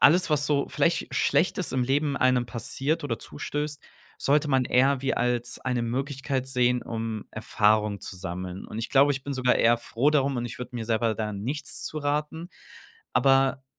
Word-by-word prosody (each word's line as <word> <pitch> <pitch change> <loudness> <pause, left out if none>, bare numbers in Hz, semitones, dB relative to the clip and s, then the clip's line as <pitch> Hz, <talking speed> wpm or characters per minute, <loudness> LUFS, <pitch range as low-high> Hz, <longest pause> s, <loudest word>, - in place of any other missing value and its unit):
alles, 170 +2 +5
was 145 -1 +2
so 140 -2 +1
vielleicht - - 0
Schlechtes - - +1
ist - - -4
im 130 -1 +1
Leben 140 +2 0
einem 130 -2 +2
passiert 135 +7 -2
oder 115 -5 -2
zustößt, 145 0 -5 0.4
sollte 150 +2 +2
man 130 -2 +2
eher 135 +2 +3
wie 135 - 0
als 120 0 0
eine 125 -2 -1
Möglichkeit 135 +2 -2
sehen, 125 -1 +1
um 110 -2 -4
Erfahrung 105 -1 +1
zu 95 - -8
sammeln. 90 0 -6
Und 110 - -7
ich 115 - -3
glaube, 140 +1 +5
ich 135 -1 -5
bin 140 - -3
sogar 130 -2 +2
eher 120 +1 +4
froh 125 +5 0
darum 140 -2 +1
und 120 - -2
ich 120 - -8
würde 125 0 -7
mir 115 - -4
selber 115 0 +1
da 110 -1 -3
nichts 135 +9 -3
zu 155 - -4
raten. 150 +3 -2 0.6
Aber 135 0 +3
130 Hz, 185 wpm, -26 LUFS, 115-140 Hz, 0.6 s, alles